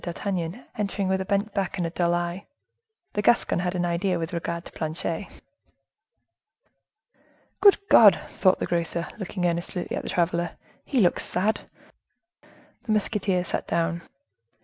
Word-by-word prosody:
D'Artagnan 180 +3 -3
entered 200 -2 -1
with 190 0 +1
a - - -3
bent 200 +1 0
back 195 -2 -2
and 175 - -1
a 165 - -3
dull 175 0 +1
eye: 175 +2 -3 0.7
the 205 - 0
Gascon 235 -5 +3
had 180 +1 -1
an 175 -1 0
idea 175 +2 0
with 165 +2 -4
regard 170 0 -3
to - - -10
Planchet. 165 +4 -3 2.3
"Good 405 -1 +7
God!" 210 - +8 0.2
thought 185 -1 +5
the - - -1
grocer, 170 0 -1
looking 185 -2 -3
earnestly 175 +1 -2
at - - -1
the - - -7
traveler, 170 -1 0 0.3
"he 270 - 0
looks 175 - +2
sad!" 205 +5 -1 1.1
The 240 - -4
musketeer 200 -3 +1
sat 180 - -3
down. 170 0 0
180 Hz, 150 wpm, -25 LUFS, 170-200 Hz, 2.3 s, God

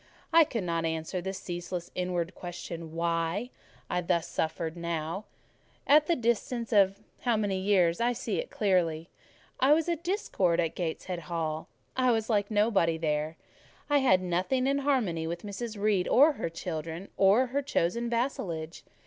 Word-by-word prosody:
I 330 -1 +8
could 230 -7 -3
not 170 -1 -1
answer 160 +2 -2
the 190 +2 -3
ceaseless 175 -1 -5
inward 180 -1 -2
question—why 170 +4 -3 0.4
I 180 - 0
thus 170 -1 0
suffered; 160 +1 -2
now, 170 +2 -3 0.6
at 300 +1 +5
the 340 - +3
distance 235 -1 -1
of—I 205 - +8
will 195 - +5
not 195 - -16 0.2
say - - -26
how 235 -2 +3
many 200 -3 0
years, 185 -2 +3
I 240 +1 +3
see - - -2
it - - -4
clearly. 170 -5 +1 0.5
I 270 +3 +6
was 320 +1 +2
a 340 - +1
discord 320 - 0
in 165 -2 +1
Gateshead 175 +1 -4
Hall: 160 -2 -3 0.3
I 255 -1 +3
was 225 -1 +1
like 205 -2 +1
nobody 205 -6 +2
there; 155 0 -1 0.5
I 290 - +5
had 190 -9 +4
nothing 185 +9 0
in 275 +1 +2
harmony 225 - 0
with 170 +1 -4
Mrs. 210 +1 -5
Reed 200 -3 +2
or 290 +5 +6
her 220 - -3
children, 165 +1 -5
or 200 +6 +5
her 280 - +2
chosen 235 -2 0
vassalage. 180 - -2
185 Hz, 165 wpm, -29 LUFS, 170-235 Hz, 0.6 s, I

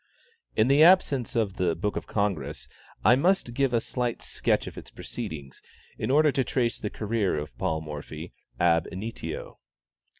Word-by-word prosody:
In 110 - +4
the 140 +3 +5
absence 155 - +5
of 105 -4 0
the 85 -3 +1
"Book 105 +5 -2
of - - -4
the - - -15
Congress," 100 -6 -1 0.4
I 125 - +8
must 170 -3 +2
give 135 +1 +1
a 120 - +3
slight 120 +1 -3
sketch - - 0
of - - -8
its - - -9
proceedings, 70 -4 -7 0.3
in - - -3
order 150 +2 +5
to 135 - +1
trace 120 -2 0
the 105 - -3
career 105 -5 -1
of 75 0 -5
Paul 80 -1 0
Morphy 75 +2 -7 0.3
ab 85 -1 +3
initio. 110 +5 -6
110 Hz, 170 wpm, -27 LUFS, 85-130 Hz, 0.4 s, I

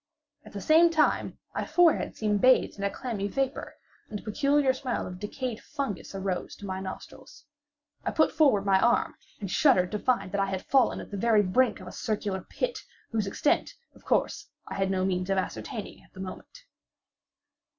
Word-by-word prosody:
At - - -14
the - - -5
same 330 +2 +6
time 315 -2 +1 0.2
my - - -2
forehead 350 -2 +3
seemed 210 -2 0
bathed 255 0 +4
in 200 - -6
a 200 - +2
clammy 215 -4 -3
vapor, 270 +5 -2 0.3
and 210 - -4
the - - -12
peculiar 280 +4 +2
smell 260 -1 -3
of 180 0 -8
decayed 230 +3 -4
fungus 275 -10 -5
arose 190 -2 -3
to 205 - -10
my 190 -1 -3
nostrils. 190 +8 -9 0.6
I - - -1
put 315 - +3
forward 245 -11 +3
my 195 -1 +4
arm, 240 - +2 0.3
and 195 -3 -5
shuddered 235 -12 +4
to 210 - -2
find 200 -7 0
that 200 - 0
I 195 - +1
had 190 -1 -4
fallen 265 -2 +3
at - - -11
the 200 - -4
very 215 0 +4
brink 245 +7 +2
of - - -10
a - - -8
circular 205 -4 -2
pit, - - -3 0.3
whose 220 -3 0
extent, 245 +8 0 0.2
of - - -20
course, - - 0 0.2
I - - -6
had 195 -1 0
no 185 -1 +1
means 185 0 -1
of 195 - +1
ascertaining 195 +3 -4
at - - -24
the - - -12
moment. 190 - -9
210 Hz, 190 wpm, -28 LUFS, 195-265 Hz, 0.6 s, same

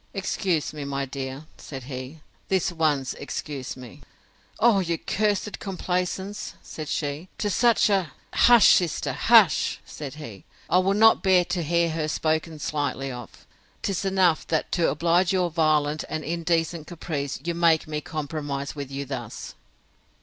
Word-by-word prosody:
Excuse 185 -5 -1
me, 150 -1 -6
my 140 0 -2
dear, 135 +2 -6
said 135 -3 -8
he; 130 +4 -7 0.3
this 190 -2 +1
once 150 -6 0
excuse 145 -2 -6
me!—Oh! 200 - -2
your 170 -3 -1
cursed 210 +3 -1
complaisance, 190 +1 -3
said 155 -1 -7
she, 150 +4 -3
to 205 - -1
such 235 +2 +4
a——. 195 -6 +1 0.2
Hush, 240 -3 +7
sister! 175 -4 +2
hush! - - +4
said 145 -2 -8
he: 115 -11 -9 0.3
I 180 - +6
will 195 +2 +2
not 225 +1 +6
bear 185 -2 +4
to 175 0 -2
hear 170 +1 +1
her 155 -1 -2
spoken 160 +1 -1
slightly 145 -2 -2
of! 120 -3 -10 0.4
'Tis 195 -2 -1
enough, 190 -4 +2
that, 160 -2 -1
to 170 - +2
oblige 170 +3 +2
your 180 -2 +1
violent 155 -2 +1
and 155 0 -3
indecent 165 -1 -1
caprice, 155 -5 -4
you 170 +1 -1
make 165 -2 +3
me 150 -1 -3
compromise 145 -2 -4
with 140 -2 -6
you 140 +1 -4
thus. 125 -5 -6
160 Hz, 150 wpm, -25 LUFS, 145-180 Hz, 0.4 s, Hush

